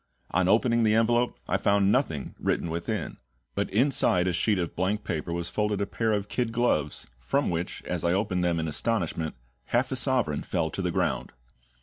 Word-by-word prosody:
On 90 +1 +2
opening 115 +3 +3
the 110 -1 +4
envelope 120 +2 +2
I - - +2
found 100 0 +3
nothing 80 - 0
written 85 - -1
within; 85 +1 -3 0.4
but - - -1
inside 110 -6 +3
a 90 - +1
sheet 100 +4 +2
of 85 -3 -3
blank 95 +4 0
paper 80 +1 -3
was 85 0 -2
folded 105 -1 0
a 100 - +1
pair 110 +2 -1
of 100 -1 0
kid 120 +2 -1
gloves, 115 -11 0
from 135 - 0
which, 85 +1 -3
as - - -3
I 85 - +2
opened 95 -1 0
them 85 -1 +1
in 80 - -1
astonishment, 85 -2 -1 0.3
half 125 +3 +1
a - - 0
sovereign 125 - +1
fell - - -1
to - - -3
the - - 0
ground. - - -1
100 Hz, 195 wpm, -27 LUFS, 85-115 Hz, 0.4 s, the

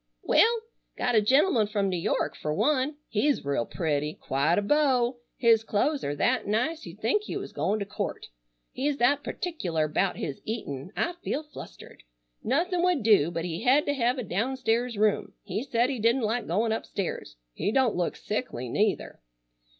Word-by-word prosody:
"Well, 460 +1 +4 0.4
got 245 - 0
a 215 - +5
gentleman 255 - +3
from 205 -2 0
New 185 - -1
York - - -1
fur 150 - -3
one. 280 - +1
He's 275 - +1
real 140 -4 0
pretty. 150 -3 -1
Quite 140 +6 0
a 205 - +2
beau. 255 -1 +2 0.2
His 230 -2 +4
clo'es 275 +8 0
are 145 - -2
that 245 - +1
nice 300 +10 -1
you'd - - -11
think 425 - +2
he - - -4
was - - -7
goin' 210 - 0
to 200 - -3
court. - - -4 0.5
He's 280 +2 -1
that 285 +4 +3
particular 175 - -2
'bout 180 +5 0
his 140 -4 -5
eatin' 180 - -5
I 345 - 0
feel 300 - -2
flustered. 300 - -12 0.4
Nothin' 345 - +1
would 355 -8 +2
do 205 -8 +5
but 165 -1 -3
he 170 0 -4
hed 265 +5 +4
to 285 - +1
hev 250 -1 +1
a 250 - -2
downstairs 235 +3 -1
room. 210 0 +1
He - - -3
said 250 -1 +1
he 260 - -3
didn't 230 +3 +2
like 225 +3 -1
goin' 215 +7 +1
upstairs. 195 - -4 0.2
He 205 - -1
don't 260 -2 +2
look 175 -1 -1
sickly, 195 - -4
neither." 205 - -1
225 Hz, 180 wpm, -27 LUFS, 190-270 Hz, 0.5 s, a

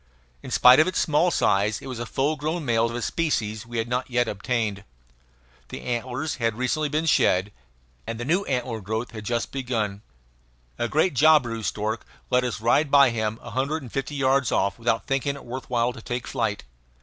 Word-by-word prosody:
In - - -9
spite 125 +2 +7
of 155 - +5
its 185 - -2
small 155 +3 +3
size 105 - +1
it - - -12
was 130 -3 -6
a 120 - -4
full 145 +6 0
grown 155 +2 -3
male, 115 -2 +2
of 115 - -5
a 120 - -3
species 110 -9 -1
we 120 0 -5
had 115 0 -1
not 125 +2 -2
yet 120 -1 +1
obtained. 105 -1 -2 0.9
The - - -7
antlers 125 +5 -3
had 115 -3 -1
recently 145 +4 0
been 155 +3 0
shed, 100 - +3 0.6
and 115 0 -4
the 120 - -4
new 175 +8 +2
antler 125 -4 -2
growth 110 +4 -3
had 110 -2 -8
just 120 +1 -2
begun. 115 -7 -2 0.8
A 120 - 0
great 155 +7 +2
jabiru 135 -5 +4
stork 110 +3 -2 0.3
let 125 0 +3
us 125 -3 -3
ride 120 +7 +2
by 140 -3 +6
him 110 -1 -2
a - - -8
hundred 140 +4 -1
and 120 - -10
fifty 135 +2 -3
yards 135 -1 +2
off 100 +2 0
without 115 -2 0
thinking 135 +1 -1
it 140 - -11
worth 125 +2 -7
while 120 0 +1
to - - -10
take 120 0 -4
flight. 110 -5 -2
125 Hz, 200 wpm, -25 LUFS, 115-140 Hz, 0.9 s, spite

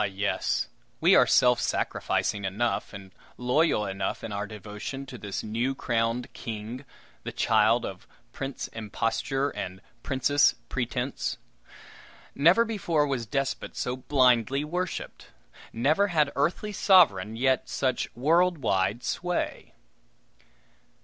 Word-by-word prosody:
yes, 100 0 -1 0.3
we - - +5
are - - +6
self 125 -1 +4
sacrificing 100 -1 -1
enough, 105 +5 -1
and 100 -2 -10 0.3
loyal 125 -2 +2
enough 95 0 -3
in 110 - -5
our 100 0 -3
devotion 105 +6 -7
to 135 - -10
this 100 -4 -5
new 115 +5 -1
crowned 115 0 -1
king, 115 +4 -6 0.4
the - - -6
child 110 +1 +3
of 95 -1 -8 0.2
Prince 135 0 -5
Imposture 115 +5 -2
and 95 +1 -6 0.2
Princess 145 +1 +3
Pretense. 125 +1 -2 1.0
Never 175 +11 +5
before 175 -9 0
was 130 -5 -2
despot 135 +4 -2
so 125 - -2
blindly 130 0 +2
worshiped! 180 +4 -4 0.4
Never 150 - +2
had 155 -6 +1
earthly 170 +9 0
sovereign 115 - +4
yet 130 +2 +1
such 130 -2 -1
world 170 +7 +3
wide 105 -3 0
sway! 180 -1 -3
125 Hz, 115 wpm, -27 LUFS, 110-145 Hz, 1.0 s, are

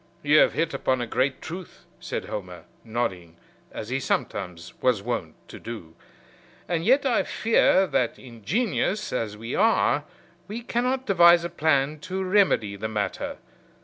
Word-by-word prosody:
"You 150 +1 +5
have - - +5
hit 165 -2 -1
upon 130 -1 0
a 120 - -1
great 130 +3 -1
truth," 180 +2 -8
said - - -4
Homer, 90 -5 -7 0.2
nodding, 95 -8 -3 0.4
as 110 - -7
he 130 +2 0
sometimes 90 -9 -3
was 125 -6 +2
wont 95 -9 -3
to - - -9
do. 105 -9 -8 0.7
"And 165 -1 -1
yet 265 +7 +4
I 245 -4 +3
fear 215 -4 +3
that, 125 -9 0
ingenious 190 - -2
as 110 -4 -2
we 115 +3 -6
are, 225 0 +3 0.4
we 225 +4 -6
cannot 250 +3 -1
devise 170 -4 +6
a - - -3
plan 150 -2 +1
to 190 +5 -4
remedy 185 - +2
the 110 +2 -4
matter. 105 -3 -3
135 Hz, 150 wpm, -25 LUFS, -, 0.7 s, devise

